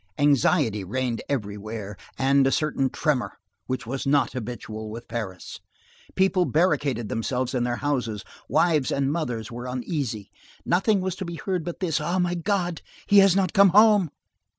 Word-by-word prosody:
Anxiety 145 - +2
reigned 120 +4 -2
everywhere, 105 -4 -4 0.2
and 135 0 +3
a - - +2
certain 135 -3 0
tremor 145 -5 -1 0.3
which 130 -4 -3
was 135 +4 -4
not 145 +1 +3
habitual 110 -3 -6
with 115 +2 -8
Paris. 105 -6 -6 0.6
People 190 -1 +3
barricaded 145 - +1
themselves 125 +4 -2
in 125 -2 0
their 120 0 -1
houses; 120 -7 -2 0.3
wives 155 -2 +2
and 140 0 0
mothers 125 -10 -3
were 120 +1 -6
uneasy; 125 - -4 0.3
nothing 195 +3 +2
was 185 -1 -2
to - - -4
be 170 0 -6
heard 180 0 -2
but 175 +2 -6
this: 170 -4 0
"Ah! 175 +2 -1
my 180 -1 +1
God! 175 -1 -1 0.3
He 205 - +7
has 195 -2 +6
not 190 -3 +1
come 200 -1 +6
home!" 205 -2 +5
140 Hz, 160 wpm, -25 LUFS, 120-175 Hz, 0.6 s, He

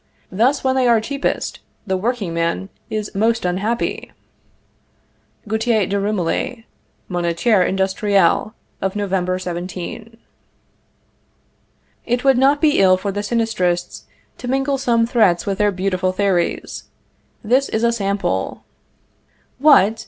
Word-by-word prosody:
Thus, 240 +9 +2
when 260 0 +1
they 260 -1 +2
are 235 -2 +5
cheapest, 275 +6 -3 0.3
the 190 -2 -1
workingman 190 -4 -2 0.2
is 215 -1 -4
most 225 +1 +1
unhappy." 205 +7 -2 1.4
(Gauthier 220 -1 +1
de 200 +2 -1
Rumilly, 210 +4 -2 0.4
Moniteur 175 +4 +1
Industriel 195 +1 +1 0.3
of 190 +1 -2
November 190 -3 -1
17.) 185 +5 -6 1.9
It 245 +1 0
would 270 -2 +4
not 280 +2 +4
be 305 -2 +3
ill 185 -1 +5
for 200 +2 -3
the 205 - -4
Sinistrists 205 -6 -1 0.3
to 245 - -6
mingle 270 +2 0
some 235 -3 +2
threats 215 -8 +2
with 195 -1 -2
their 210 0 +3
beautiful 185 -1 -1
theories. 185 -2 -1 0.6
This 255 +5 +2
is 220 - -1
a 235 - +4
sample: 200 - -2 1.0
"What! 225 -7 +5
205 Hz, 115 wpm, -19 LUFS, 185-235 Hz, 1.9 s, are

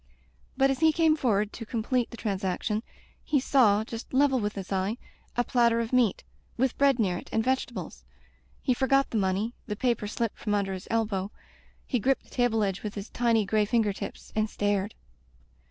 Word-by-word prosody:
But 270 0 +4
as 270 - -2
he 320 0 +5
came 320 -1 +3
forward 215 -7 +1
to 230 - -6
complete 235 +2 -1
the 235 - -10
transaction, 200 +1 -1 0.4
he 295 -2 +2
saw, 225 -6 +4
just 230 +1 -8
level 270 -1 +4
with 210 -1 -2
his 195 -1 -6
eye, 195 +4 0 0.4
a 245 - +3
platter 235 -1 +3
of 230 +1 -3
meat, 245 -6 +3 0.3
with 260 +1 +1
bread 275 -2 +4
near 190 -7 +1
it - - -13
and 225 - +1
vegetables. 240 - -2 0.6
He 255 - +3
forgot 275 +2 +2
the 225 - +1
money, 195 +4 0
the 210 - -2
paper 235 -2 0
slipped 230 +1 -3
from 210 -2 0
under 195 -1 0
his 185 0 -7
elbow, 210 -4 0 0.6
he 250 - 0
gripped 265 +5 +1
the - - -23
table 240 -3 +2
edge 195 -2 -1
with 210 -1 -5
his 200 +1 -6
tiny 230 -3 +2
gray 215 +2 +2
finger 215 -2 +1
tips, - - -8
and 215 0 +1
stared. 205 0 -1
225 Hz, 190 wpm, -28 LUFS, 205-250 Hz, 0.6 s, he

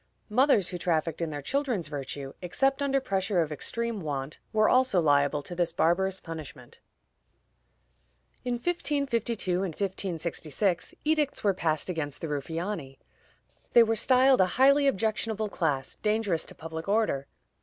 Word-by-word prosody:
Mothers 225 - +3
who 180 - -5
trafficked 165 -1 -1
in 165 - -1
their 145 -2 -6
children's 250 - -1
virtue, 140 -1 -6
except 270 - +1
under 275 -1 +2
pressure 195 -5 0
of 155 - -7
extreme 230 +8 -3
want, 145 -2 -4
were 215 -1 +3
also 255 -7 +4
liable 145 -2 +2
to 175 - -7
this 175 -1 0
barbarous 185 +3 +1
punishment. 150 -7 -9 1.6
In 245 -1 -1
1552 240 - -1
and 180 -5 -3
1566, 180 -1 -2
edicts 300 -2 +1
were 205 - +4
again 190 - -9
passed 155 -2 +1
against 155 -6 -3
the 165 - -4
Ruffiani. 150 0 -4 0.8
They 235 - +8
were 225 0 +1
styled 260 0 +5
a 185 - +4
highly 280 +2 +5
objectionable 220 -2 0
class, 145 -8 -1
dangerous 210 -6 0
to - - -5
public 160 +2 -7
order. 200 -11 +1
185 Hz, 145 wpm, -28 LUFS, 160-230 Hz, 1.6 s, They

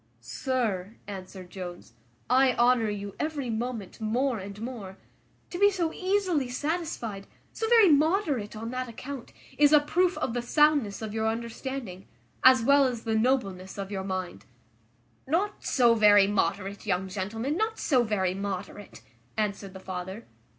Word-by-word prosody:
"Sir," 215 - -2
answered 185 -2 -9
Jones, 175 -8 -8 0.3
"I 260 0 +4
honour 240 -2 +3
you 200 -1 -5
every 290 -6 -2
moment 225 -2 -4
more 240 +2 0
and 200 +1 -8
more. 220 -5 -7 0.5
To 350 - -5
be 405 0 +7
so 345 -5 -1
easily 370 -8 0
satisfied, 255 - -3 0.3
so 445 - -2
very 455 -5 +7
moderate 300 - +2
on 225 +2 -5
that 255 -1 -3
account, 255 +2 -8 0.3
is 295 -1 +6
a 300 - +8
proof 355 +5 +1
of - - -2
the 245 - -1
soundness 280 -5 +2
of 215 -1 -5
your 220 0 0
understanding, 230 -3 -5 0.4
as 255 -2 +7
well 280 +2 +5
as 245 -3 -2
the 225 - -1
nobleness 220 -6 0
of 195 0 -5
your 190 -2 -3
mind." 185 -2 -4 0.8
"Not 370 +8 -1
so 240 -3 +4
very 205 -3 +6
moderate, 200 +1 -1
young 190 -1 0
gentleman, 215 +9 -3
not 440 +3 -1
so 255 -5 +2
very 195 -5 0
moderate," 200 +1 -6 0.3
answered 200 -2 -2
the - - -7
father. 190 +3 -6
230 Hz, 150 wpm, -28 LUFS, 200-280 Hz, 0.8 s, a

